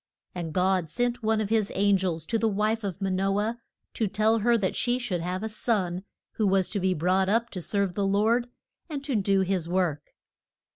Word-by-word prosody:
And 170 -3 -4
God 185 -1 +1
sent 245 +3 -1
one 220 0 +1
of 210 -2 -2
his 220 -3 +2
an 200 +1 +4
gels 175 -4 -1
to 225 +4 0
the 225 - +2
wife 215 +2 0
of 195 0 -4
Ma 195 - 0
no 195 +2 +1
ah 215 +2 0 0.4
to 220 - 0
tell 215 +3 +2
her 235 +2 +3
that 195 -4 -1
she 245 0 +1
should 215 -9 -2
have 180 +3 -3
a - - -1
son 200 -4 -1 0.3
who 215 - 0
was 190 -1 +2
to 205 - -2
be 185 0 +1
brought 185 +4 +2
up 230 +3 +1
to 185 - -5
serve 200 +1 -1
the 200 0 0
Lord, 225 +5 +2 0.4
and 285 -3 -4
to 280 -3 -2
do 195 -2 +2
his 185 -3 -1
work. 175 -5 -1
200 Hz, 220 wpm, -27 LUFS, 185-220 Hz, 0.4 s, an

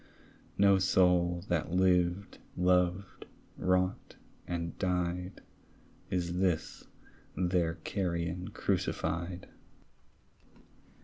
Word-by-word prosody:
No 100 -1 +5
soul 90 -2 +3
that 85 -2 0
lived, 90 +1 +1 0.2
loved, 90 +1 +1 0.3
wrought, 90 0 0 0.3
and 85 -1 -3
died, 90 0 -2 0.7
Is 90 -1 -1
this 90 -4 -1 0.5
their 90 -2 +1
carrion 85 +1 -3
crucified. 90 -3 -2
90 Hz, 70 wpm, -31 LUFS, 85-95 Hz, 0.7 s, No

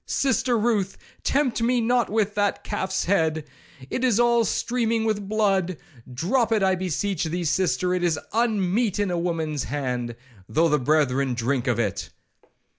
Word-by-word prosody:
Sister 260 -3 +1
Ruth, 210 -4 0 0.2
tempt 265 -4 0
me 245 +1 +2
not 240 0 +1
with 210 -1 0
that 205 -1 0
calf's 190 -2 -2
head, 160 -5 +1 0.5
it 255 - -2
is 240 -4 +3
all 235 -1 +4
streaming 230 -2 0
with 205 -3 -1
blood;—drop 190 - -1
it, 215 -3 +2
I 190 0 +3
beseech 185 0 -1
thee, 175 +2 -2
sister, 180 +1 +1
it 180 - 0
is 170 -4 +1 0.2
unmeet 215 -2 +1
in 205 -3 0
a 175 - -1
woman's 160 -4 -2
hand, 125 -4 -3 0.3
though 165 +2 +2
the 150 -1 +2
brethren 135 -2 +1
drink 125 +2 -1
of 120 -3 +1
it. 100 -4 -2
190 Hz, 155 wpm, -24 LUFS, 155-225 Hz, 0.5 s, all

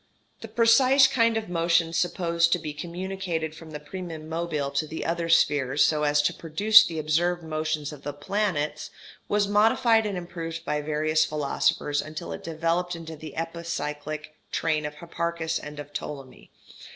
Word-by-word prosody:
] - - -39
The 225 - -7
precise 240 +5 +5
kind 230 -3 +3
of 220 -1 -3
motion 165 -1 +1
supposed 170 -1 +1
to - - +3
be 155 -3 -6
communicated 175 0 -4
from 165 0 -12
the 150 -1 -6
primum 160 0 -7
mobile 160 -4 -2
to 140 +3 -1
the 160 - -5
other 170 0 -1
spheres 145 -4 +3
so 155 -1 +1
as 145 0 +3
to - - +1
produce 210 +7 +6
the 170 -6 -4
observed 170 +3 0
motions 155 -1 -2
of 145 - -11
the 145 - -4
planets 150 -1 -2 0.4
was 205 -1 +1
modified 225 +2 +4
and 200 -3 -3
improved 170 -2 -6
by 150 0 -1
various 155 +1 +1
philosophers 145 0 0
until 155 - -7
it 80 - -6
developed 170 +2 -1
into 165 -1 -8
the 155 +1 -10
epicyclic 155 -2 -4 0.2
train 155 -2 0
of 150 - -9
Hipparchus 170 0 -3
and 150 0 -9
of 145 0 -9
Ptolemy. 135 -3 -7
165 Hz, 165 wpm, -26 LUFS, 150-175 Hz, 0.4 s, produce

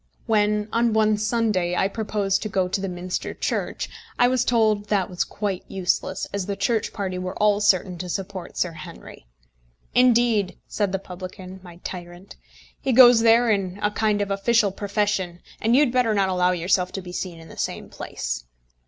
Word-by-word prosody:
When, 210 -2 +2
on 230 -1 +2
one 215 -1 +3
Sunday, 215 -5 0
I 190 - +2
proposed 205 -2 -1
to 215 - -3
go 190 -2 +1
to 190 +2 -2
the 195 - -2
Minster 180 0 -4
Church, - - -2 0.3
I 245 - +5
was 255 -1 +2
told 215 -3 +2
that 195 -3 0
was 180 - 0
quite 200 -3 -4
useless, 190 0 -1
as 200 -2 -2
the 200 - -2
Church 210 +3 0
party 190 -3 -3
were 185 +1 -4
all 210 -1 +3
certain 185 -3 +2
to 180 - -5
support 190 -1 -5
Sir 180 - 0
Henry! 155 - -11 0.7
"Indeed," 240 -5 +3
said 205 -3 -1
the 195 - 0
publican, 185 0 -9
my 175 -2 -12
tyrant, 175 +1 -8 0.5
"he 265 - 0
goes 245 -1 +8
there 230 +1 +5
in 195 -2 -1
a 210 - +2
kind 210 -1 +1
of 200 - -5
official 205 +1 +2
profession, 200 -3 -1 0.2
and 230 +2 +3
you 275 - +6
had 260 - +1
better 240 -4 +2
not 195 -1 +2
allow 180 -1 +2
yourself 180 +1 +1
to 195 - -4
be 180 - -8
seen 175 -2 -5
in 160 - -13
the - - -11
same - - -4
place." - - -5
200 Hz, 190 wpm, -24 LUFS, 185-215 Hz, 0.7 s, goes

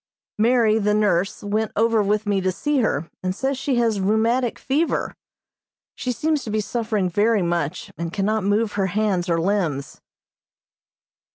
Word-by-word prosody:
Mary, 225 -1 +3
the 210 0 +1
nurse, 200 -3 +1
went 215 +2 -1
over 225 0 +3
with 210 +1 0
me 200 -2 +1
to 185 0 +1
see 295 +9 0
her, 165 - 0
and 185 0 -2
says 270 +5 -1
she 265 0 -1
has 230 -4 +1
rheumatic 225 +5 +1
fever. 295 +5 -1 0.8
She 255 - -3
seems 305 +3 0
to - - -6
be 215 0 0
suffering 215 -3 -1
very 205 +3 +2
much, 170 -1 -2
and 170 -1 -3
cannot 210 +2 0
move 205 +2 +1
her 195 -2 0
hands 190 -2 0
or 165 -1 +2
limbs. 165 -7 -1
210 Hz, 160 wpm, -22 LUFS, 190-230 Hz, 0.8 s, Mary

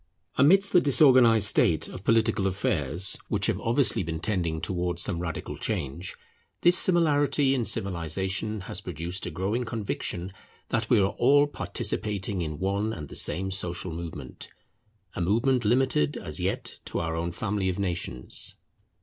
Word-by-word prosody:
Amidst 195 +9 +5
the 180 - +5
disorganized 130 -7 +5
state 85 -4 +3
of 95 - -9
political 115 -3 +2
affairs, 90 -2 -1
which - - 0
have - - 0
obviously 120 +1 +2
been 80 -2 -4
tending 85 -5 -1
towards 90 -1 -1
some 90 -4 0
radical 85 -2 -5
change, 80 +7 -3 0.5
this 175 +1 +5
similarity 145 -6 +3
in 125 -4 0
civilization 95 +4 -2
has 95 0 -5
produced 90 +1 -5
a - - -2
growing 95 +9 -2
conviction 100 -5 -4 0.4
that 115 0 -1
we 120 - +5
are 100 0 +1
all 145 +4 +5
participating 100 -8 -2
in 75 -2 -4
one 100 +5 -1
and 75 -6 -7
the - - -8
same 95 +5 +1
social 90 -1 -3
movement; 80 -6 -8 0.7
a - - -3
movement 115 +7 +1
limited 120 - +2
as - - -5
yet - - -3
to - - -4
our 80 0 -2
own 85 +1 -2
family 100 0 -2
of 90 - -3
nations. 85 -10 -2
95 Hz, 150 wpm, -27 LUFS, 85-115 Hz, 0.7 s, Amidst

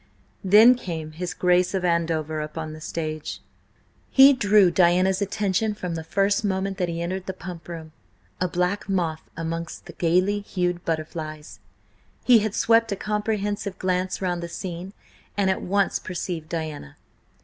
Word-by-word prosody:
Then 210 +6 +8
came 165 -10 -5
his 170 +1 -5
Grace 180 +1 +2
of 185 -1 -1
Andover 160 -2 0
upon 155 +1 -5
the 155 - -10
stage. 155 -1 -4 0.7
He 275 +1 +8
drew 205 -6 +4
Diana's 185 +2 +3
attention 205 +1 0
from 180 -4 -4
the 160 -1 -4
first 200 +5 +1
moment 195 0 -1
that 180 -1 0
he 170 0 -3
entered 185 +2 -4
the 190 - -4
Pump 175 -2 -9
Room–a 165 +2 -7
black 180 +4 -1
moth 170 -5 0 0.2
amongst 165 0 -5
the - - -10
gaily 185 +4 +2
hued 180 -3 -2
butterflies. 155 -1 -4 0.6
He 245 -3 +7
had 215 0 -2
swept 230 -1 +3
a - - 0
comprehensive 210 -1 -2
glance 185 +1 -1
round 175 -1 -1
the 170 - -5
scene 180 +1 -6 0.4
and 195 -2 +3
at 190 - -2
once 200 +1 +1
perceived 170 -3 -5
Diana. 155 - -5
180 Hz, 150 wpm, -24 LUFS, 165-200 Hz, 0.7 s, Then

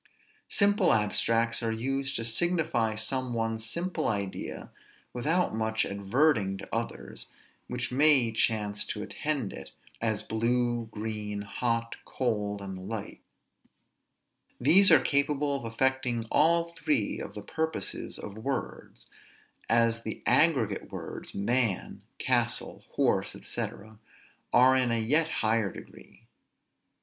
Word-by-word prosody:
Simple 205 0 +4
abstracts 115 +2 +1
are 115 -1 -1
used 135 +4 -2
to 115 - 0
signify 120 -3 +1
some 125 +2 -2
one 115 -1 -1
simple 170 +9 -2
idea 100 -3 -4 0.4
without 160 +7 +1
much 110 0 0
adverting 100 0 +1
to 100 - -9
others 115 0 -4 0.4
which 125 0 -3
may 135 -3 +5
chance 105 -2 0
to 105 - -4
attend 140 -3 -3
it, - - -10 0.3
as 110 -2 0
blue, 120 +1 0
green, 105 -1 -4
hot, 115 +2 -2
cold, 105 -5 -2
and 95 -1 -6
the 95 - -8
like; 105 +2 -6 1.4
these 195 +1 +7
are 160 - +9
capable 140 0 +1
of 115 -4 -6
affecting 125 -1 0
all 170 +2 +3
three 145 -10 0
of - - -7
the 105 - -7
purposes 160 -6 -2
of 105 +1 -8
words; 135 +3 -5 0.6
as 115 0 +3
the 110 -1 -6
aggregate 130 - +2
words, - - -6
man, 115 0 0 0.2
castle, - - 0
horse, - - +1
&c. - - -2 0.8
are 130 +1 +6
in 130 -2 +2
a 115 - +1
yet 150 +9 +2
higher 110 - +1
degree. - - -14
115 Hz, 120 wpm, -29 LUFS, 110-140 Hz, 1.4 s, are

